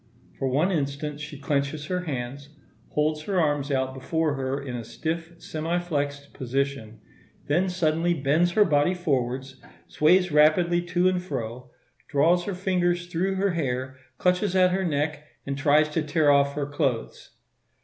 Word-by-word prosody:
For 135 - 0
one 150 +9 +2
instant 145 -2 -2
she 150 -1 -7
clenches 140 +1 -1
her 180 -1 -1
hands, 140 0 -5 0.4
holds 150 +1 0
her 195 -3 0
arms 145 -3 +1
out 130 -1 0
before 155 +3 -1
her 135 0 -2
in 135 -3 -6
a 120 - -5
stiff 165 +7 -4
semi 160 +2 -3
flexed 145 -5 -3
position; 130 -3 -3 0.5
then 175 +6 +1
suddenly 170 -1 +1
bends 160 +5 +2
her 210 +1 +5
body 150 +2 +2
forwards, 130 -5 -2 0.3
sways 180 +3 +3
rapidly 165 +4 +4
to 180 +1 +2
and 185 -1 +1
fro, 125 -6 -5 0.4
draws 170 +5 +3
her 200 - -3
fingers 180 -2 0
through 180 +3 -1
her 195 +1 +1
hair, 130 -5 -2 0.2
clutches 180 - +1
at 185 -1 +5
her 190 +1 0
neck, 150 -2 -1 0.2
and 140 - -2
tries 150 +2 +4
to 160 +1 -1
tear 150 -1 +3
off 140 0 +3
her 145 -1 -1
clothes. 135 -5 -3
150 Hz, 160 wpm, -26 LUFS, 140-175 Hz, 0.5 s, her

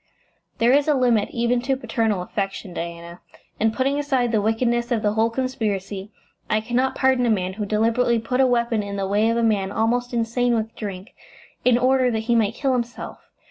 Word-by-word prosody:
"There 235 +1 +3
is 285 +2 +3
a 300 - +3
limit 240 -5 +2
even 240 +1 0
to 265 +1 0
paternal 225 -8 -1
affection, 195 -1 -4
Diana. 170 0 -7 0.4
And 220 0 +2
putting 275 +4 0
aside 265 -5 0
the 220 -2 +2
wickedness 235 +3 0
of 230 -3 0
the 210 0 +1
whole 225 +1 +2
conspiracy, 210 -6 -3 0.4
I 215 - +2
cannot 245 +4 0
pardon 260 -2 +2
a - - +2
man 185 -4 0
who 210 +1 -4
deliberately 230 +3 +2
put 250 +3 0
a 260 - +5
weapon 235 -2 +1
in 200 -1 -5
the 195 -1 -2
way 210 +3 +2
of 230 - +1
a 235 - +1
man 200 -4 +1
almost 240 +3 0
insane 240 +1 0
with 225 0 -3
drink, 195 -2 -7 0.5
in 250 -1 +4
order 255 0 +3
that 220 -2 -1
he 235 +2 0
might 225 -1 +2
kill 270 -2 0
himself. 240 -1 -5
230 Hz, 200 wpm, -22 LUFS, 210-250 Hz, 0.5 s, a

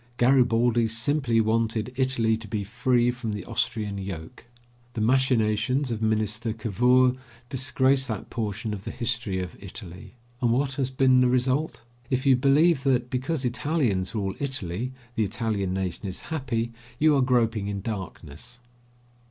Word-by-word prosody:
Garibaldi 120 -2 +3
simply 115 +2 +1
wanted 115 +1 0
Italy 125 -4 +2
to 110 0 -8
be 105 -2 -2
free 120 +3 +1
from 120 -3 -5
the 105 -3 -5
Austrian 105 -3 -2
yoke. 95 +2 -8 0.5
The 110 - -3
machinations 125 +1 +2
of 110 -1 -3
Minister 110 +1 0
Cavour 125 +4 +3 0.4
disgrace 130 0 +1
that 110 -5 -5
portion 110 -1 -3
of 100 -2 -6
the - - -5
history 120 -5 -2
of 90 -1 -5
Italy. 95 0 -9 0.3
And 120 - +2
what 135 +3 +1
has 130 -1 -1
been 130 -1 +4
the 125 - +4
result? 130 +2 0 0.3
If 130 0 -1
you 135 -1 +6
believe 140 +4 +4
that, 125 -3 +1
because 130 +2 -2
Italians 120 - 0
rule 100 -3 -1
Italy, 125 -4 -2 0.2
the 115 -3 +1
Italian 105 -3 -2
nation 95 +1 -3
is 95 - -5
happy, 120 -6 -2 0.2
you 155 +1 +4
are 135 - +3
groping 115 -5 +1
in 100 -1 -3
darkness. 100 +1 -7
120 Hz, 150 wpm, -26 LUFS, 105-130 Hz, 0.5 s, you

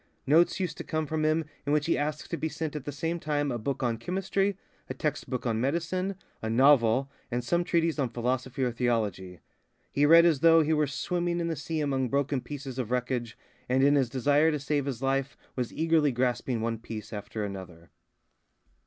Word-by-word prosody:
Notes 165 +7 +4
used 185 -2 -2
to - - -4
come 155 0 -2
from 155 +1 -2
him 155 +1 +2 0.2
in 145 - -2
which 150 -1 +2
he 165 - +2
asked 150 +1 -3
to - - 0
be 160 -1 -2
sent 155 -1 -4
at 145 -2 -5
the 145 - -3
same 165 +4 -2
time 145 -2 -1
a 120 - -2
book 135 +4 -3
on 115 -2 0
chemistry, 195 +5 -1 0.3
a - - -4
text 150 -2 -3
book 125 -1 -3
of 115 -2 +1
medicine, 170 - -1 0.3
a 110 - -3
novel, 130 +1 +4 0.2
and 120 0 -2
some 170 +8 +1
treatise 165 -2 +1
on 130 -3 +1
philosophy 125 +2 -2
or 125 - +1
theology. 105 -7 -2 0.5
He 145 +1 +3
read 165 +2 +8
as 160 -5 +3
though 165 +1 +6
he 155 +1 +1
were 150 -1 +2
swimming 175 +4 -1
in 170 0 -1
the 165 - -1
sea 160 +2 -3
among 135 -3 0
broken 140 0 0
pieces 135 -2 -7
of 120 -4 -2
wreckage, 125 -2 -2 0.3
and 130 +1 +3
in 140 +1 +5
his 135 -4 +2
desire 145 +5 +3
to 150 - 0
save 145 0 -1
his 135 -3 -4
life 135 0 0 0.2
was 125 -2 -2
eagerly 160 -2 +2
grasping 125 -1 -1
one 115 0 -2
piece 110 -1 -8
after 105 +1 -5
another. 90 -4 -8
140 Hz, 205 wpm, -28 LUFS, 120-160 Hz, 0.5 s, read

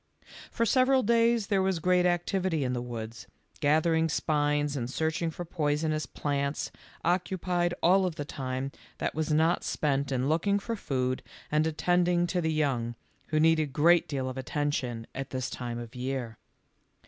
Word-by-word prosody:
For 230 - 0
several 260 +3 +4
days 230 0 +3
there 195 -1 +1
was 190 -1 +1
great 180 +2 +3
activity 175 -2 0
in 125 -1 -1
the 120 - -2
woods; 115 -2 -7 0.3
gathering 160 +2 +3
spines 145 -1 +1
and 120 -3 -3
searching 160 +4 -1
for 175 +2 -6
poisonous 155 -1 -1
plants 140 0 -2 0.3
occupied 175 0 0
all 185 +2 +5
of 170 - -4
the 145 - -4
time 130 -1 -4 0.3
that - - -2
was 155 0 -1
not 160 +3 +3
spent 140 -2 0
in 130 0 0
looking 170 +7 +2
for 230 +3 -3
food 130 - -1 0.3
and 155 +1 +3
at 160 -1 -4
tending 175 0 +3
to 180 0 -1
the 160 -1 0
young, 130 -7 0 0.3
who 155 - +1
need 160 +1 +5
a 155 - +1
great 165 +5 +4
deal 135 -3 -2
of 130 0 -4
attention 130 -5 -2
at 135 0 -5
this 130 -2 -3
time 120 -1 -4
of 120 -1 -7
year. 125 -3 -4
155 Hz, 170 wpm, -29 LUFS, 135-175 Hz, 0.3 s, all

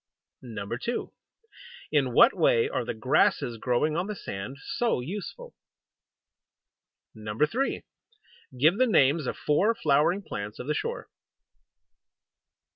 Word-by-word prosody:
2. 115 - -4 0.8
In - - +2
what - - +6
way 485 -3 +3
are 450 - -2
the - - -4
grasses 115 -2 +1
growing 130 +6 0
on 180 +3 -1
the 210 - -4
sand 100 - -7
so 240 - -1
useful? 205 - -7 1.6
3. 115 - -1 0.8
Give 160 +8 +4
the 255 - +4
names 150 - +3
of - - -3
four 205 +10 +2
flowering 155 +6 +2
plants 100 - -6
of - - -7
the 150 - 0
shore. 475 - -4
150 Hz, 115 wpm, -27 LUFS, -, 1.6 s, what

